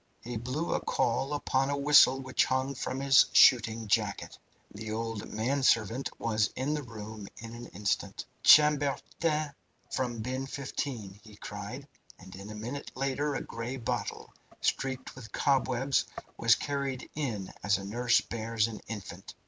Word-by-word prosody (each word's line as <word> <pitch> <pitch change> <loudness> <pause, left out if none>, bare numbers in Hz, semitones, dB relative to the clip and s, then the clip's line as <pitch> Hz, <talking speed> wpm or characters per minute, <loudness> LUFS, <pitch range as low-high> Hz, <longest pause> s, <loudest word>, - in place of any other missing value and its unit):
He 120 +1 -5
blew 130 +9 -2
a - - +1
call 130 +4 0
upon 135 -2 0
a 140 - 0
whistle 140 -2 +6
which 130 -1 +1
hung 130 +1 0
from 130 0 -4
his 135 -1 +6
shooting 115 -3 +5
jacket. - - 0 0.4
The 110 +1 -6
old 115 -1 -4
manservant 120 0 +1
was 110 -2 +1
in 135 +4 -1
the 150 - -2
room 110 -4 -8
in 115 0 -8
an 120 0 -8
instant. 100 +2 -2 0.2
"Chambertin 150 +1 +4 0.4
from 120 -3 -2
bin 130 +2 -3
15!" 125 -7 -5
he 110 -2 -14
cried, 105 +8 -7 0.3
and 95 0 -12
a 100 +3 -8
minute 120 +7 -6
later 135 +2 -1
a - - -2
grey 115 +3 -5
bottle, 115 - -4 0.3
streaked 130 -1 -1
with 120 -4 -11
cobwebs, 135 -1 +1 0.3
was - - +5
carried 140 -2 -3
in 115 -11 -3
as 100 0 +2
a 95 - -7
nurse 120 +4 +2
bears 115 -1 -1
an 110 -2 -7
infant. 95 -4 -8
125 Hz, 150 wpm, -30 LUFS, 110-135 Hz, 0.4 s, whistle